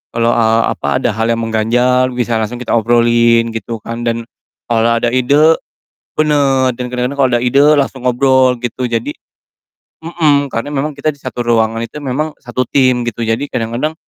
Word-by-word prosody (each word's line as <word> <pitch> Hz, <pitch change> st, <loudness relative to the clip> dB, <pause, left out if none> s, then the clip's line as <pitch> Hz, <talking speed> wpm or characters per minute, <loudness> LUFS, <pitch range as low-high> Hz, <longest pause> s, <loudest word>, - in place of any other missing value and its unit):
kalo, 115 Hz, 0 st, +2 dB
eee, 115 Hz, -1 st, +2 dB
apa, 70 Hz, 0 st, -2 dB
ada 120 Hz, -, 0 dB
hal 115 Hz, +2 st, -1 dB
yang 115 Hz, 0 st, 0 dB
mengganjal 125 Hz, +3 st, +1 dB
bisa 120 Hz, -2 st, -1 dB
langsung 110 Hz, +2 st, -3 dB
kita 125 Hz, -, -5 dB
obrolin 115 Hz, 0 st, +3 dB
gitu 115 Hz, +1 st, -5 dB
kan 115 Hz, +1 st, -6 dB
dan 115 Hz, 0 st, -1 dB, 0.4 s
kalo 115 Hz, 0 st, +1 dB
ada 120 Hz, 0 st, 0 dB
ide 145 Hz, +6 st, +3 dB, 0.6 s
bener, 140 Hz, -4 st, +2 dB
dan 125 Hz, 0 st, -5 dB
kadang-kadang 125 Hz, +3 st, -2 dB
kalo 135 Hz, -2 st, +3 dB
ada 120 Hz, -, -3 dB
ide 140 Hz, +3 st, +3 dB, 0.2 s
langsung 135 Hz, -2 st, -1 dB
ngobrol 130 Hz, 0 st, +3 dB
gitu. 125 Hz, +1 st, -3 dB
Jadi 115 Hz, -1 st, -2 dB, 0.9 s
mhm, 155 Hz, -4 st, +1 dB
karena 115 Hz, +6 st, -4 dB
memang 145 Hz, +2 st, -2 dB
kita 155 Hz, -, 0 dB
di 140 Hz, -, -22 dB
satu 125 Hz, -2 st, -5 dB
ruangan 115 Hz, -1 st, +1 dB
itu 135 Hz, +6 st, -7 dB
memang 145 Hz, +3 st, -2 dB
satu 125 Hz, 0 st, -2 dB
tim 130 Hz, -3 st, +2 dB
gitu, 115 Hz, 0 st, -3 dB
jadi 115 Hz, 0 st, 0 dB
kadang-kadang 120 Hz, +7 st, -2 dB
120 Hz, 175 wpm, -15 LUFS, 115-135 Hz, 0.9 s, obrolin